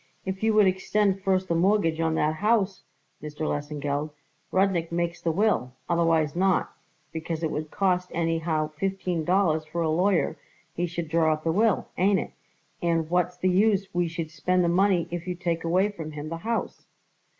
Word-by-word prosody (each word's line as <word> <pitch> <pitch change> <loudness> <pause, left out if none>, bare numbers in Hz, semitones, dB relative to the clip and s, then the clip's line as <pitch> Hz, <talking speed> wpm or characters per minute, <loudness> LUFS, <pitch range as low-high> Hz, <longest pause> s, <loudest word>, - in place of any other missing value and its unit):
If 190 0 -4
you 220 0 +2
would 210 -1 +6
extend 195 +1 +1
first 190 -1 +1
the 170 - 0
mortgage 170 -2 +2
on 160 -1 +1
that 155 0 +1
house, 210 -1 +1 0.4
Mr. 150 0 -8
Lesengeld, 145 0 -2 0.4
Rudnik 185 -3 +1
makes 170 0 -2
the 165 - 0
will, 170 - +1
otherwise 165 -3 +2
not; 190 +1 +1 0.4
because 165 0 -4
it 160 - 0
would 155 0 -4
cost 180 -1 0
anyhow 165 -2 0
fifteen 185 -1 -2
dollars 175 -3 +2
for 165 +2 -3
a 160 - +1
lawyer 185 +3 +1 0.4
he 175 +1 -1
should 170 -1 -4
draw 160 0 +3
up 155 0 -6
the 165 - +1
will, 210 +3 +2
ain't 195 +2 +4
it, - - -5 0.5
and 165 -1 0
what's 180 0 +1
the 185 - +1
use 195 +1 +2
we 175 0 +1
should 165 -1 -5
spend 180 +4 +1
the - - +2
money 180 -1 +2
if 175 0 -5
you 180 - -2
take 170 -2 -2
away 185 +5 +2
from 160 -6 -7
him 150 +1 -6
the 165 - -4
house?" 225 +6 -3
170 Hz, 185 wpm, -26 LUFS, 160-190 Hz, 0.5 s, would